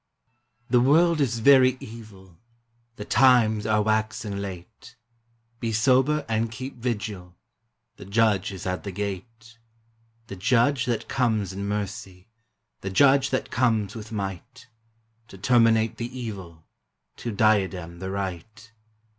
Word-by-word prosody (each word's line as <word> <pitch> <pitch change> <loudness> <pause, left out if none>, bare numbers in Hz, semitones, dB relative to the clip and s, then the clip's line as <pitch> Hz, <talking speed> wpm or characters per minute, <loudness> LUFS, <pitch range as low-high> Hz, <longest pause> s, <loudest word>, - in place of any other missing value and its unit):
"] 120 0 -45
The 125 -1 +5
world 160 +4 +4
is 120 -4 0
very 130 +1 +5
evil, 100 -6 -13 0.6
The 105 - -8
times 110 -4 +4
are 105 -1 +2
waxing 110 -1 -1
late; 100 +5 -9 0.6
Be 115 -2 -2
sober 130 +6 +2
and 115 0 -1
keep 130 +3 -7
vigil, 105 -7 -4 0.6
The - - -11
Judge 100 -1 +1
is 95 -2 -8
at 90 0 -2
the 100 - -5
gate, 115 +4 -7 0.3
— 115 0 -40
The 100 - -7
Judge 125 +6 +2
that 120 -2 -2
conies 110 -7 0
in 100 +1 -5
mercy, 100 -2 -5 0.5
The 95 - -5
Judge 135 +6 +4
that 130 - -2
comes 110 -5 +1
with 110 -1 -9
might, 105 +5 -6 0.6
To 95 - -13
terminate 115 +1 +3
the 120 +2 -6
evil, 95 -9 -8 0.5
To 120 - -5
diadem 95 -5 0
the 95 +1 -5
right. 100 +4 -6
110 Hz, 135 wpm, -25 LUFS, 100-120 Hz, 0.6 s, The